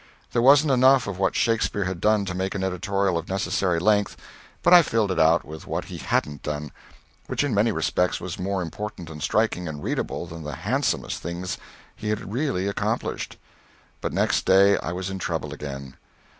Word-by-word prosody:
There 120 - +2
wasn't 140 +3 +6
enough 130 +1 +5
of 100 -2 -5
what 95 -1 +1
Shakespeare 115 -3 +1
had 95 -2 -4
done 105 -1 +3
to 90 - -3
make 95 +2 -2
an 95 - -2
editorial 95 -1 0
of 85 - -9
the - - -3
necessary 95 -2 0
length, 105 +3 +2 0.5
but 175 - +6
I 175 - +10
filled 110 - 0
it - - -1
out 80 +1 +4
with 80 +1 -9
what - - -3
he - - -8
hadn't 75 -2 -1
done 75 -1 -4 0.6
which - - 0
in 145 -5 0
many 105 +3 +3
respects 90 -3 0
was 90 0 -6
more 95 0 -1
important 90 -1 -6
and 75 -1 -9
striking 100 -2 +1
and 75 -2 -6
readable - - -2
than 85 -1 -9
the 75 -1 -5
handsomest - - -1
things 85 +1 -4 0.4
he 105 - -5
had 105 -1 -3
really 125 -8 0
accomplished. 100 - -2 0.6
But - - -2
next - - +1
day 100 +1 +6
I - - -4
was 90 +2 -4
in 95 - -4
trouble 80 -5 -3
again. 70 -3 -7
95 Hz, 195 wpm, -25 LUFS, 85-105 Hz, 0.6 s, I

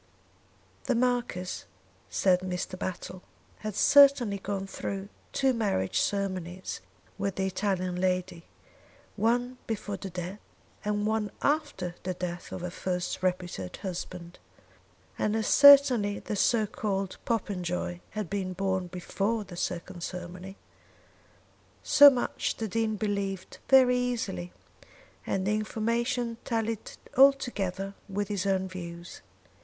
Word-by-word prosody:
"The 255 - +1
Marquis," 240 -7 -1 0.4
said 185 -2 +3
Mr. 185 0 -4
Battle, 185 0 -5 0.4
"had 215 -2 -5
certainly 270 -7 +6
gone 195 0 -3
through 195 0 -5 0.2
two 270 -1 +2
marriage 200 - 0
ceremonies 185 -3 -2 0.4
with 200 -1 -1
the 190 - 0
Italian 185 -2 -1
lady, 180 -2 -1 0.7
one 245 +4 0
before 205 -2 -3
the 195 - -6
death 180 +3 -6 0.4
and 210 0 0
one 215 -1 0
after 290 - 0
the 185 0 -3
death 180 0 -5
of - - -5
her 180 0 -4
first 180 0 -3
reputed 180 - -2
husband. 180 -2 -6 0.8
And 215 - +1
as 220 -1 0
certainly 265 -8 +7
the 215 - -4
so 220 +2 +3
called 195 -2 -3
Popenjoy 180 -6 -2
had 210 -2 -4
been 190 0 -3
born 190 -1 -1
before 200 +5 -2
the 185 -3 -10
second 175 +1 -4
ceremony." 180 +2 -7 1.3
So 285 0 +9
much 255 -3 -1
the 225 - -2
Dean 220 +1 0
believed 200 -3 -3
very 255 -2 +6
easily, 225 -8 -2 0.8
and 190 -1 0
the 210 - +2
information 230 +2 -1
tallied 225 -2 -2 0.2
altogether 215 -8 +3 0.2
with 200 +1 -2
his 200 -1 -1
own 190 -1 +1
views. 170 -2 -8
195 Hz, 120 wpm, -29 LUFS, 185-225 Hz, 1.3 s, So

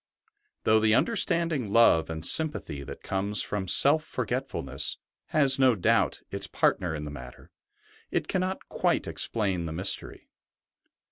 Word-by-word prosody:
Though 110 0 +3
the 110 0 +3
understanding 165 - +1
love 105 -9 +4
and 80 0 -4
sympathy 150 - +2
that 70 - -10
comes 100 +2 -1
from 100 -2 -4
self 145 - +5
forgetful 125 - -4
ness 70 - -3 0.3
has 140 -3 +3
no 130 -3 +4
doubt 90 - +1
its - - -4
part - - 0
in 80 -4 -4
the 75 - -7
matter, 65 -3 -12 0.6
it - - -2
cannot 185 0 -3
quite - - -1
explain 95 -7 -1
the 80 - -6
mystery. 95 +4 -2
110 Hz, 140 wpm, -27 LUFS, 85-135 Hz, 0.6 s, self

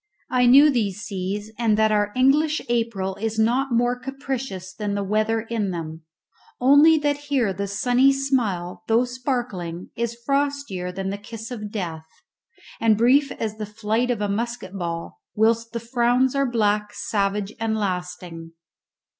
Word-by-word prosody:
I 250 -1 +4
knew 280 +4 +8
these 210 -6 -1
seas, 200 +1 -4
and 220 -3 +2
that 220 0 +3
our 205 -1 +1
English 295 +4 +3
April 225 -5 -1
is 220 +1 -3
not 245 +5 +2
more 240 +1 +2
capricious 255 -7 -5
than 205 -1 -3
the 200 - -1
weather 215 +3 +1
in 225 -3 -2
them, 160 -2 -6 0.5
only 285 +5 +6
that 290 -1 0
here 245 -8 +1
the 200 +2 -3
sunny 245 +7 +3
smile, 235 -11 -1
though 230 +2 +3
sparkling, 240 -9 -4
is 235 0 -3
frostier 280 -10 -1
than 190 +1 -4
the 200 - -5
kiss 225 +2 -9
of 210 -4 -5
death, 165 -6 -5 0.7
and 220 -2 +3
brief 270 +5 +4
as 215 -1 -4
the 215 -1 -5
flight 220 +3 -1
of 235 -4 -1
a 205 - +1
musket 235 0 -3
ball, 170 - -5
whilst 230 +1 +2
the 235 - -3
frowns 245 +2 +2
are 275 -2 +1
black, 210 -2 +1
savage, 200 -1 -1
and 225 -1 0
lasting. 180 -4 -4
225 Hz, 155 wpm, -23 LUFS, 200-250 Hz, 0.7 s, knew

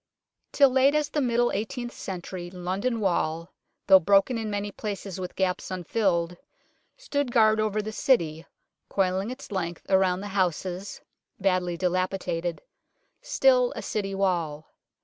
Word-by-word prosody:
Till 275 -2 +5
late 265 +3 +4
as 300 -1 +1
the 295 - -1
middle 240 -1 +2
eighteenth 240 +4 -3
century 180 -3 -6
London 190 +7 -2
Wall, 170 -4 -1 0.3
though 190 -1 +8
broken 200 +7 +3
in 225 -1 -3
many 205 0 -3
places, 200 -2 -5
with 180 -1 -6
gaps 185 -1 -1
unfilled, 180 -2 0 0.6
stood 285 - -2
guard 220 -2 +4
over 215 -1 0
the 215 - -4
City, 165 - +1 0.4
coiling 190 +2 0
its 255 -1 -8
length 175 -3 -3
around 190 -1 +3
the 205 - -6
houses, 185 0 -2 0.4
badly 185 -3 +1
dilapi 185 +1 0
dated 175 -2 -3 0.6
still - - +3
a - - -5
City 195 -2 -3
Wall. 170 -6 -1
195 Hz, 140 wpm, -26 LUFS, 180-225 Hz, 0.6 s, though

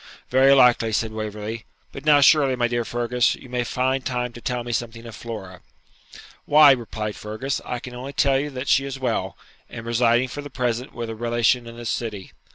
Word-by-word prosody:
'Very 135 +2 +5
likely,' 125 -4 +5
said 110 +1 -1
Waverley; 110 +1 -5 0.3
'but 135 - -10
now 145 -1 +6
surely, 140 -2 +5
my 120 -1 +1
dear 120 0 -1
Fergus, 120 +1 0
you - - -14
may 125 0 -1
find 130 +2 -1
time 125 -1 -2
to 120 - -11
tell 125 -1 -2
me 120 - -5
something 115 0 -4
of 115 -2 -9
Flora.' 95 -5 -8 0.8
'Why,' 150 -1 +7
replied 110 -4 -2
Fergus, 110 +6 -4
'I 125 - -3
can 125 - -9
only 130 +3 -7
tell 135 -2 +2
you 145 +2 -3
that 130 -1 -6
she 135 - +4
is 135 -1 -5
well, 125 -4 -2 0.3
and 115 - -8
residing 120 +2 +2
for 145 - -6
the 145 - -9
present 125 -1 -3
with 115 -1 -4
a - - -6
relation 120 +1 +1
in 115 0 -10
this 120 -1 -3
city. 105 -5 -5
120 Hz, 205 wpm, -23 LUFS, 115-130 Hz, 0.8 s, Why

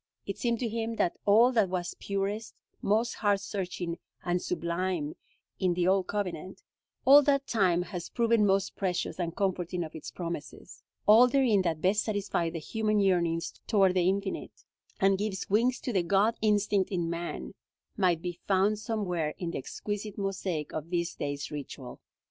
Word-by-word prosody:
It 200 - -5
seemed 235 -1 +1
to 240 - 0
him 225 +1 -3
that 175 - +1
all 225 +5 +6
that 220 -6 +2
was 180 -1 -2
purest, 200 +2 -3 0.3
most 220 +3 +1
heart 205 -2 +1
searching 180 -4 -4 0.3
and 175 0 0
sublime 170 -2 -2 0.4
in 180 -2 +1
the 175 0 +1
Old 190 -1 +3
Covenant; 190 -2 -4 0.4
all 280 +3 +9
that 280 -1 +2
time 185 -7 +2
has 175 -1 -6
proven 230 -2 +2
most 195 -1 +2
precious 185 -1 -2
and 170 -2 -2
comforting 180 -2 -1
of 155 - -8
its 160 - -7
promises; 150 -8 -7 0.2
all 225 +5 +8
therein 245 -6 +3
that 165 -4 -1
best 195 +3 +3
satisfies 200 -5 -1
the - - -3
human 215 +6 0
yearnings 170 -4 +1
toward 195 -3 +4
the 180 -1 +3
Infinite, 195 0 -3 0.4
and 195 0 +3
gives 200 -2 -3
wings 240 +5 +3
to 245 - -3
the 190 - +3
God 200 +6 +2
instinct 205 -2 +2
in 175 -4 -1
man, 170 +1 -4 0.4
might 180 -5 +2
be 175 -1 -4
found 200 +2 +2
somewhere 185 -8 -2
in 175 -2 -3
the - - -3
exquisite 205 +8 -5
mosaic 190 -6 -3
of 155 +1 -5
this 170 -1 -1
day's 145 0 -4
ritual. 140 -3 -7
190 Hz, 165 wpm, -29 LUFS, 175-210 Hz, 0.4 s, all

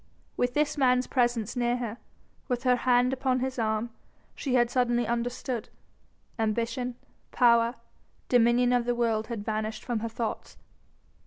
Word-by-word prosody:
With 245 0 0
this 295 0 +1
man's 250 -1 +3
presence 240 -4 0
near 240 0 +1
her, 235 -1 -5 0.5
with 250 -2 -2
her 250 -1 +4
hand 245 +1 +2
upon 260 -1 0
his 260 0 -3
arm, 220 +1 -1 0.4
she 260 -3 -2
had 240 -1 +3
suddenly 240 -1 +1
understood. 240 0 -3 0.7
Ambition, 235 +3 -1 0.4
power, 235 -1 +4 0.5
dominion 245 0 +4
of 245 -1 +2
the 245 0 0
world 225 -2 0
had 225 -4 -5
vanished 215 0 -3
from 240 -3 -1
her 230 +1 -3
thoughts. 225 -1 -5
240 Hz, 145 wpm, -28 LUFS, 230-250 Hz, 0.7 s, her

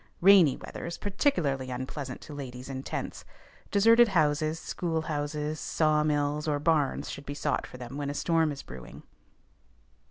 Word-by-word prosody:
Rainy 185 -7 +7
weather - - -7
is 170 - -5
particularly 175 - 0
unpleasant 130 +1 -5
to 150 - -10
ladies 130 -2 -7
in 130 -1 -4
tents; - - -5 0.5
deserted 230 +4 +6
houses, 155 -3 +1
schoolhouses, 155 -3 -2
saw 155 -1 +2
mills, 150 0 0
or 150 -1 +1
barns 150 -2 +1
should 140 - -6
be 145 - -4
sought - - -1
for - - -11
them 125 +2 -7
when 145 -1 -2
a 145 - -4
storm 165 0 +2
is 140 - -7
brewing. 65 -1 -10
150 Hz, 155 wpm, -29 LUFS, 140-165 Hz, 0.5 s, Rainy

